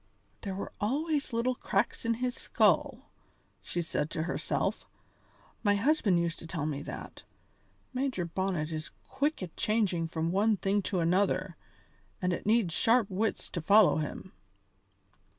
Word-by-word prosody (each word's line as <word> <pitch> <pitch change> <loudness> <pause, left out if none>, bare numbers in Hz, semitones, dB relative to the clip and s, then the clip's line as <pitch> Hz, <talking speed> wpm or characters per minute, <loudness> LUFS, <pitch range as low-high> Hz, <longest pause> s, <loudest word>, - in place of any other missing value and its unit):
"There 195 -3 -4
were 195 - -5
always 285 +6 0
little 235 +2 +1
cracks 245 - -1
in 230 0 +2
his 250 +1 -1
skull," - - +1 0.5
she 175 - -3
said 150 -2 -2
to 160 -2 -2
herself. 170 - -2 0.7
"My 205 -2 +3
husband 220 - +3
used 170 -1 -1
to 165 - -8
tell 160 -3 -3
me 145 -2 -2
that. - - -8 0.7
Major 255 -8 -1
Bonnet 170 -3 -2
is 155 0 -4 0.2
quick 290 -6 -1
at 175 - -8
changing 200 -7 +1
from 165 +1 -2
one 210 +3 +3
thing 195 +3 +1
to 185 -3 0
another, 185 +1 +1 0.6
and 180 0 0
it 175 - -4
needs 215 -6 +3
sharp 225 +1 +3
wits 205 +3 -1
to 170 - -3
follow 200 +3 +6
him." 155 +4 -4
195 Hz, 150 wpm, -30 LUFS, 170-225 Hz, 0.7 s, follow